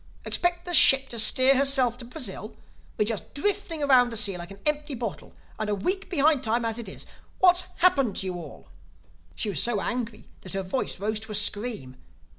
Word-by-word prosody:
Expect 350 0 -2
the 355 - 0
ship 270 -4 +7
to 235 - -4
steer 260 +4 +5
herself 265 -3 +2
to 245 - -8
Brazil? 225 -5 -8 0.4
We're 210 - +1
just 215 -1 -6
drifting 335 -1 -2
around 255 -3 +4
the 230 - -4
sea 205 -3 +3
like 175 0 -8
an 195 - -12
empty 300 -1 -2
bottle—and 215 -1 -8
a 205 - 0
week 370 - -3
behind 305 -5 +2
time 230 0 0
as 225 +1 -3
it 225 -5 -7
is. - - -10 0.3
What's 365 -1 +3
happened 275 - +1
to - - -2
you 185 - -4
all?" 170 -5 -11 0.7
She 215 - -3
was 160 - 0
so 235 -3 0
angry 230 0 -5 0.2
that 185 - -8
her 195 0 -3
voice 185 +1 -4
rose 215 +2 -2
to 220 0 -10
a - - -3
scream. 205 - -1
240 Hz, 200 wpm, -25 LUFS, 210-280 Hz, 0.7 s, ship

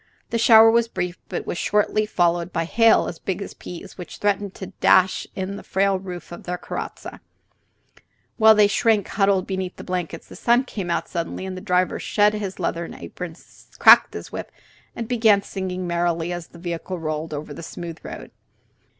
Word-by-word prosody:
The 230 - 0
shower 225 -1 +8
was 235 0 +3
brief, 180 -5 -4
but - - -4
was 175 - -4
shortly 210 +1 +1
followed 175 -2 +1
by 165 -1 -1
hail 225 +6 +4
as 165 - -6
big 190 0 -3
as 200 - -7
peas, 180 +2 -10
which 180 - -8
threatened 205 -1 -1
to 195 0 -8
dash 185 0 +4
in 195 +1 -4
the - - -10
frail 195 0 +1
roof 180 -2 -8
of 175 - -8
their 180 0 -4
carrozza. - - -7 1.2
While 220 -1 +7
they 210 -1 +6
shrank 210 0 +2
huddled 195 -2 +2
beneath 190 -2 -4
the - - -10
blankets, 175 -3 -4
the - - -12
sun 240 +2 +3
came 200 -8 -6
out 170 - -1
suddenly, 170 +2 -4
and 190 -1 -5
the 185 - -7
driver 185 -2 +1
shed 210 0 +2
his 205 -3 -4
leathern 170 -1 -3
apron, 175 -3 -8 0.4
cracked - - +7
his - - -7
whip, - - -6 0.4
and 230 - -4
began 220 -4 +3
singing 185 -2 -4
merrily 170 0 -1
as 175 -2 -6
the - - -15
vehicle 170 +1 -5
rolled 155 -1 -4
over 150 0 -5
the 145 - -9
smooth 165 0 -7
road. - - -9
185 Hz, 185 wpm, -23 LUFS, 175-205 Hz, 1.2 s, shower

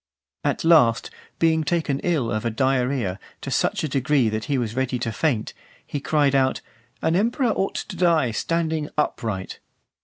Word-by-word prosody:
At 145 - -1
last, 150 -9 +4 0.3
being 160 -1 +2
taken 155 -4 0
ill 150 -10 0
of 110 - -1
a 115 - 0
diarrhoea, 125 -4 0 0.2
to - - -5
such - - 0
a - - 0
degree 135 -3 +2
that 110 0 -3
he 140 - 0
was 115 -3 -2
ready 130 -1 0
to 120 -2 -2
faint, 120 -3 -1 0.3
he 145 - -4
cried 145 -1 +2
out, 130 -1 +2 0.4
"An 160 - +2
emperor 235 +5 +1
ought 195 -2 -1
to 195 - -5
die 165 -8 +3
standing 160 +3 -1
upright." 110 -9 -2
140 Hz, 165 wpm, -23 LUFS, 120-160 Hz, 0.4 s, last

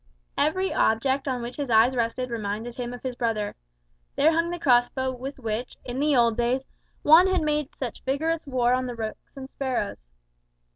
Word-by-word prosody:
Every 375 +6 +1
object 265 +5 +1
on 250 -3 -1
which 240 +1 -6
his 285 -3 -3
eyes 230 +3 +5
rested 240 +1 -1
reminded 220 +1 -3
him 240 0 -5
of 245 - -9
his 260 -1 -3
brother. 225 -4 -2 0.6
There 305 +3 +4
hung 335 +1 +1
the 350 - -3
cross 245 -7 +4
bow 260 -1 -2
with 260 +2 -7
which, 230 0 -4
in 250 +2 -3
old 235 -2 +4
days, 245 +2 +1 0.4
Juan 320 +5 +7
had 375 -3 +1
made 300 -2 -1
such 250 -4 -5
vigorous 320 +4 -1
war 250 -2 +2
on 255 0 0
the 245 - -5
rooks 220 -1 -6
and 265 -1 -7
the - - -39
sparrows. 240 - -3
255 Hz, 190 wpm, -26 LUFS, 235-280 Hz, 0.6 s, Juan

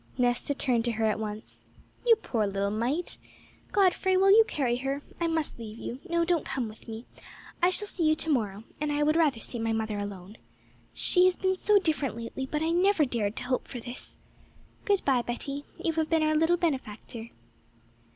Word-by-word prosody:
Nesta 245 +3 +1
turned 245 -4 +1
to 235 - +1
her 220 0 0
at 215 0 +1
once. 215 0 -7 0.4
'You 460 - +8
poor 230 - -1
little 200 0 -1
mite! 250 +11 -1 0.5
Godfrey, 375 -1 +3
will 390 +1 +5
you 445 +2 +8
carry 250 - 0
her? 275 +2 -3 0.2
I 340 - +1
must 320 -6 -1
leave 220 -1 -8
you. 245 +2 -6
No, 340 0 +2
don't 340 -2 +1
come 265 -3 -2
with 215 +2 -13
me. 225 +1 -7 0.6
I 350 - +5
shall 415 +3 -1
see 345 -4 -1
you 310 - +4
to 320 - -3
morrow, 210 -6 0 0.2
and 300 -1 0
I 295 0 +1
would 305 +1 +3
rather 300 -8 +3
see 235 - -3
my 225 0 0
mother 220 -2 -2
alone. 200 0 -7 0.5
She 360 0 +3
has 370 0 +4
been 375 0 +1
so 415 +2 +3
different 300 - +1
lately, 235 +3 -5
but 300 +3 -1
I 325 - +1
never 360 -2 +4
dared 225 -5 -1
to - - -4
hope 255 0 -1
for 245 - -6
this! 240 +2 -6 0.7
Good 405 -2 +2
bye, 260 -3 +3
Betty; 275 +4 -3
you 330 - -1
have 315 -1 0
been 320 -1 +3
our 310 0 +3
little 325 +3 +3
benefactor.' 235 -7 -3
275 Hz, 200 wpm, -28 LUFS, 225-335 Hz, 0.7 s, You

